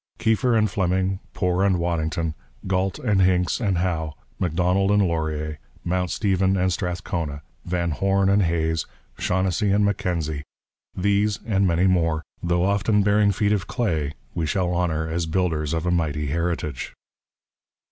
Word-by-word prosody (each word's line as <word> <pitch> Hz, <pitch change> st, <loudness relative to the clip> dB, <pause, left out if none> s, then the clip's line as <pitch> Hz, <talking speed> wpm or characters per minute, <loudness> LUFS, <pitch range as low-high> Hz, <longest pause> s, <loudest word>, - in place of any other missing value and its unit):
Keefer 115 Hz, +2 st, +2 dB
and 110 Hz, -1 st, +3 dB
Fleming, 95 Hz, 0 st, 0 dB, 0.2 s
Poor 90 Hz, -1 st, +1 dB
and 95 Hz, -2 st, +3 dB
Waddington, 80 Hz, -1 st, -1 dB, 0.3 s
Galt 95 Hz, 0 st, 0 dB
and 100 Hz, -3 st, +1 dB
Hincks 90 Hz, -2 st, +2 dB
and 100 Hz, -7 st, 0 dB
Howe, 80 Hz, -4 st, -1 dB, 0.2 s
Macdonald 90 Hz, +3 st, +1 dB
and 105 Hz, 0 st, +4 dB
Laurier, 75 Hz, -2 st, -2 dB, 0.2 s
Mount 90 Hz, 0 st, 0 dB
Stephen 95 Hz, -1 st, +1 dB
and 90 Hz, 0 st, +1 dB
Strathcona, 85 Hz, -5 st, -3 dB, 0.2 s
Van 85 Hz, -1 st, -1 dB
Horne 95 Hz, +4 st, +1 dB
and 100 Hz, +1 st, +4 dB
Hays, 80 Hz, -2 st, 0 dB, 0.3 s
Shaughnessy 95 Hz, +2 st, +1 dB
and 100 Hz, +1 st, +3 dB
Mackenzie, 85 Hz, -7 st, -1 dB, 0.5 s
these 100 Hz, +2 st, +1 dB
and 100 Hz, -3 st, +2 dB
many 85 Hz, +1 st, +2 dB
more, 80 Hz, -4 st, +2 dB, 0.2 s
though 85 Hz, +1 st, +1 dB
often 100 Hz, +1 st, +2 dB
bearing 100 Hz, 0 st, +4 dB
feet 100 Hz, +1 st, +1 dB
of 100 Hz, -2 st, -1 dB
clay, 85 Hz, -, -1 dB, 0.2 s
we 80 Hz, -2 st, -1 dB
shall 90 Hz, +2 st, 0 dB
honour 80 Hz, -3 st, 0 dB
as 80 Hz, +1 st, -2 dB
builders 80 Hz, -3 st, 0 dB
of 80 Hz, 0 st, -1 dB
a 90 Hz, -, +1 dB
mighty 75 Hz, -3 st, 0 dB
heritage. 80 Hz, -3 st, -2 dB
90 Hz, 145 wpm, -24 LUFS, 80-95 Hz, 0.5 s, and